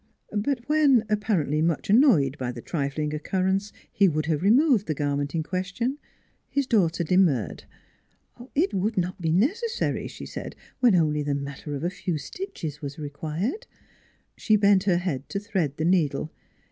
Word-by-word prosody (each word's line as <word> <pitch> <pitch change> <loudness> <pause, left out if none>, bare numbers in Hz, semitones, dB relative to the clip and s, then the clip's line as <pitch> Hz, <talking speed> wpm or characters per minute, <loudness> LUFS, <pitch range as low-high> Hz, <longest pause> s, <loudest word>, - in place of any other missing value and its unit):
But 240 +3 -1
when, 295 -6 +4
apparently 185 -8 +1
much 165 -1 0
annoyed 200 - +5
by 125 -2 -2
the 120 - -8
trifling 150 +2 -2
occurrence, 190 +5 -1 0.2
he 200 - +4
would 155 -3 0
have 155 -1 0
removed 235 - +4
the 155 - -1
garment 145 +1 -1
in 160 - 0
question, 195 - -3 0.5
his 280 -1 0
daughter 180 -8 +2
demurred. 165 - +1 0.9
It 330 +7 +2
would 200 +3 -1
not 185 +1 -1
be 160 -1 0
necessary, 400 - 0
she - - -9
said, - - -7 0.2
when 245 -6 +5
only 150 -3 +2
the 145 -1 -1
matter 140 +1 -5
of 140 - -5
a 175 - 0
few 180 -3 -3
stitches 150 - -6
was 140 -1 -6
required. 160 - -4 0.7
She 215 - +2
bent 200 -2 +4
her 180 -4 +3
head 160 -7 -3
to 200 - -2
thread 190 -9 -2
the 155 - -1
needle. 155 -4 +1
180 Hz, 160 wpm, -25 LUFS, 150-210 Hz, 0.9 s, annoyed